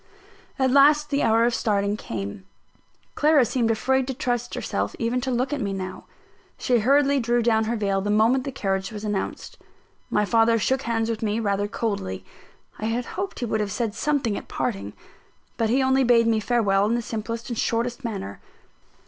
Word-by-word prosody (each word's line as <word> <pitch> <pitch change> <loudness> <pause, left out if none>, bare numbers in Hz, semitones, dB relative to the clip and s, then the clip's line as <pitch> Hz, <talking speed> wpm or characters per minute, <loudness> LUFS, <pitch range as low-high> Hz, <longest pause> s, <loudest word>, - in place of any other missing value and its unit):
At 260 -1 +2
last 295 +2 +5
the 280 - +1
hour 225 +1 +3
of 240 - +1
starting 205 -3 0
came. 115 - -6 0.7
Clara 295 -3 +4
seemed 235 0 0
afraid 255 +4 +1
to 265 - -3
trust 245 -3 -2
herself - - -3
even 240 +2 -1
to 265 - -3
look 255 +3 0
at 285 - -2
me 200 -2 -2
now. 185 -1 -6 0.5
She 245 -2 +2
hurriedly 280 +4 +3
drew 240 0 +1
down 220 -1 +2
her 230 +2 -1
veil 200 -3 0
the 205 - -3
moment 225 +5 +3
the 275 - -4
carriage 195 -3 -2
was 210 -1 -7
announced. 205 -2 -4 0.5
My 210 - +1
father 230 +1 +3
shook 260 +4 0
hands 225 -3 -1
with 220 - -4
me 215 0 0
rather 205 -2 0
coldly. 95 - -3 0.5
I 215 - -3
had 235 +2 -1
hoped 385 +2 -4
he - - 0
would 220 -1 -1
have 205 -1 -2
said 215 +1 -2
something 270 -5 0
at - - -7
parting; 215 -6 -3 0.6
but 225 -2 0
he 260 +3 +2
only 265 0 +3
bade 235 -2 +4
me 225 -1 +2
farewell 205 -3 +2
in 230 - +1
the 240 - -2
simplest 230 +2 -5
and 235 - -4
shortest 240 +3 -1
manner. 150 - -5
230 Hz, 190 wpm, -24 LUFS, 210-255 Hz, 0.7 s, last